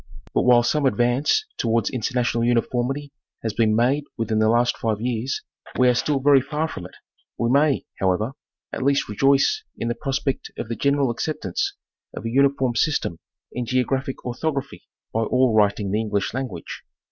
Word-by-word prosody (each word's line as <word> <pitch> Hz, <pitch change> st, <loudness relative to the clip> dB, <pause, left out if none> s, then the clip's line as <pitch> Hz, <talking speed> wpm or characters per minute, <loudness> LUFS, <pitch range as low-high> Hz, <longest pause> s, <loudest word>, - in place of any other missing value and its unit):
But -, -, +2 dB
while 120 Hz, -1 st, +6 dB
some 140 Hz, +3 st, +2 dB
advance 125 Hz, -, +2 dB
towards 115 Hz, -2 st, +1 dB
international 120 Hz, -1 st, 0 dB
uniformity 125 Hz, +4 st, 0 dB, 0.3 s
has 110 Hz, -2 st, -2 dB
been 110 Hz, -1 st, +2 dB
made 130 Hz, +6 st, +2 dB
within 115 Hz, -2 st, 0 dB
the 110 Hz, 0 st, +3 dB
last 120 Hz, +1 st, +3 dB
five 110 Hz, -2 st, -1 dB
years, 120 Hz, +2 st, -2 dB, 0.3 s
we 125 Hz, -, +5 dB
are -, -, +4 dB
still 140 Hz, +3 st, 0 dB
very 140 Hz, 0 st, +5 dB
far 150 Hz, +4 st, -2 dB
from 95 Hz, -, -7 dB
it; -, -, -19 dB, 0.4 s
we 115 Hz, 0 st, 0 dB
may, 140 Hz, 0 st, +3 dB
however, 95 Hz, +5 st, +1 dB, 0.4 s
at -, -, -3 dB
least 140 Hz, +1 st, +2 dB
rejoice 140 Hz, -, +2 dB
in 115 Hz, -, -2 dB
the -, -, +1 dB
pros 135 Hz, -2 st, 0 dB
pect 135 Hz, -2 st, -3 dB
of 110 Hz, -, -5 dB
the 115 Hz, -, -2 dB
general 140 Hz, -1 st, +2 dB
acceptance 115 Hz, -, -2 dB, 0.4 s
of -, -, -7 dB
a 115 Hz, -, -2 dB
uniform 135 Hz, -1 st, +2 dB
system 130 Hz, -, 0 dB, 0.3 s
in 125 Hz, -1 st, -4 dB
geographic 130 Hz, +2 st, -1 dB
orthography 140 Hz, +2 st, -3 dB, 0.3 s
by 115 Hz, -, +1 dB
all 125 Hz, +1 st, +2 dB
writing 105 Hz, -2 st, +2 dB
the 105 Hz, -, +1 dB
English 105 Hz, -2 st, -1 dB
language. 125 Hz, -10 st, -5 dB
125 Hz, 170 wpm, -23 LUFS, 115-135 Hz, 0.4 s, while